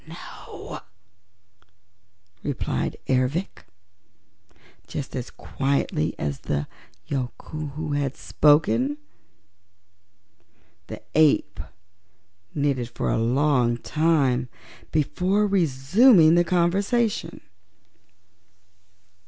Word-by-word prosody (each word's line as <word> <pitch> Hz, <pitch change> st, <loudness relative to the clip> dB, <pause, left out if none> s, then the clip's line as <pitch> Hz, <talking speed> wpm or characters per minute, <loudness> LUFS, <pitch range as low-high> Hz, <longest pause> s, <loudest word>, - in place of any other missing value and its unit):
"No," -, -, -9 dB, 1.6 s
replied 140 Hz, -5 st, -2 dB
Ervic, 130 Hz, +8 st, -1 dB, 1.2 s
just 140 Hz, -, -6 dB
as 125 Hz, -1 st, -4 dB
quietly 135 Hz, -, -1 dB
as 70 Hz, -2 st, -3 dB
the 75 Hz, 0 st, -2 dB, 0.4 s
Yookoohoo 150 Hz, +3 st, -5 dB
had 140 Hz, -2 st, -2 dB
spoken. 145 Hz, -2 st, +2 dB, 1.9 s
The -, -, -8 dB
ape 155 Hz, -1 st, +3 dB, 1.0 s
knitted 140 Hz, -5 st, 0 dB
for -, -, -2 dB
a -, -, +1 dB
long 125 Hz, 0 st, +2 dB
time 135 Hz, -4 st, +1 dB, 0.4 s
before 185 Hz, +7 st, +1 dB
resuming 175 Hz, -, +5 dB
the 175 Hz, 0 st, +5 dB
conversation. 195 Hz, +6 st, 0 dB
145 Hz, 70 wpm, -24 LUFS, 130-170 Hz, 1.9 s, resuming